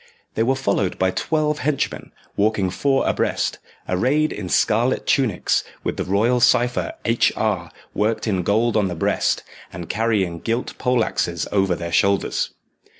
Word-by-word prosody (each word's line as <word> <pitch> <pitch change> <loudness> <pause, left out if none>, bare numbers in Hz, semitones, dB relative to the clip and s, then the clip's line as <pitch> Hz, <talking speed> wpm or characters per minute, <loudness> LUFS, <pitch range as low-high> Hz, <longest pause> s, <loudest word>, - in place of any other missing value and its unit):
They - - -1
were 130 +4 +2
followed 100 -7 0
by 95 0 +2
twelve 150 - 0
henchmen, 145 -2 -2 0.2
walking 100 -3 +1
four 135 +7 +1
abreast, - - 0 0.3
arrayed 135 +12 +1
in 95 -3 -6
scarlet - - +2
tunics, - - +1 0.2
with - - -2
the - - -1
royal 110 +6 +2
cypher 120 +1 +2
H.R. 110 -6 +1 0.2
worked 110 +1 0
in 95 -5 0
gold 110 +6 +1
on 105 -3 +2
the 90 - -4
breast, 80 - 0 0.3
and 85 -2 -8
carrying 105 -7 0
gilt 115 +7 -2
poleaxes 115 -9 0
over 95 -3 +2
their 85 0 -5
shoulders. 100 +3 +1
105 Hz, 145 wpm, -21 LUFS, 95-120 Hz, 0.3 s, were